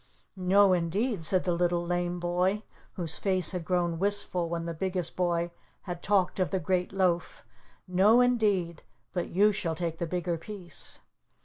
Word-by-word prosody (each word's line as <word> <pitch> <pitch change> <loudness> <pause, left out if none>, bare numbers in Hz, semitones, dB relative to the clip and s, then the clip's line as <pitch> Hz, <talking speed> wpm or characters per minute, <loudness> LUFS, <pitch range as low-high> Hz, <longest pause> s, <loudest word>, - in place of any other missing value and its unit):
"No, 190 +1 +4
indeed," 185 +4 0
said 185 0 +3
the 180 -1 +1
Little 175 0 +1
Lame 175 0 -1
Boy, 180 +4 0 0.3
whose 170 -5 -4
face 185 -4 +1
had 180 -3 -3
grown 175 -1 0
wistful 195 -3 0
when 170 0 -3
the 170 - -3
Biggest 180 0 -2
Boy 175 -1 0 0.3
had 175 -2 -6
talked 195 -2 +1
of 185 - +1
the 190 - 0
great 180 +1 0
loaf. 185 -3 0 0.4
"No, 195 +6 +5
indeed, 205 -9 +2 0.3
but 175 -2 -2
you 205 +4 +4
shall 170 -5 -2
take 165 -1 -3
the 170 - -2
bigger 175 -1 -2
piece." 180 -3 -7
180 Hz, 165 wpm, -29 LUFS, 170-195 Hz, 0.4 s, No